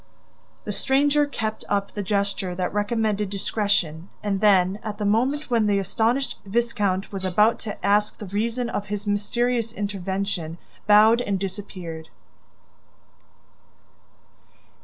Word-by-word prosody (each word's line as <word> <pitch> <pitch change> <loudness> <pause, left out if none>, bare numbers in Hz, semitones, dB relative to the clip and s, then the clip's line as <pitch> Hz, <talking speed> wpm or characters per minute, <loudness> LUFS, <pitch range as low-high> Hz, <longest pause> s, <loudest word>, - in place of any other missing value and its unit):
The - - -4
stranger 290 +2 +2
kept 220 -6 -4
up 200 -1 0
the 205 - -3
gesture 200 -2 -1
that 180 0 -2
recommended 210 -1 0
discretion 195 -4 -1
and 200 -2 -1
then, 195 -1 +4
at 215 -1 -5
the 210 - -2
moment 255 +7 +1
when 225 -3 +3
the 205 -1 +3
astonished 225 +7 0
viscount 205 -3 0
was 195 -2 -5
about 210 +5 +3
to 210 - -6
ask 210 +1 +2
the 210 - -7
reason 230 +5 -1
of 205 -3 -3
his 205 +1 -4
mysterious 230 +3 0
intervention, 195 -5 -3 0.3
bowed 215 +3 +6
and 200 -5 -1
disappeared. 185 -4 -6
205 Hz, 125 wpm, -24 LUFS, 195-225 Hz, 0.3 s, bowed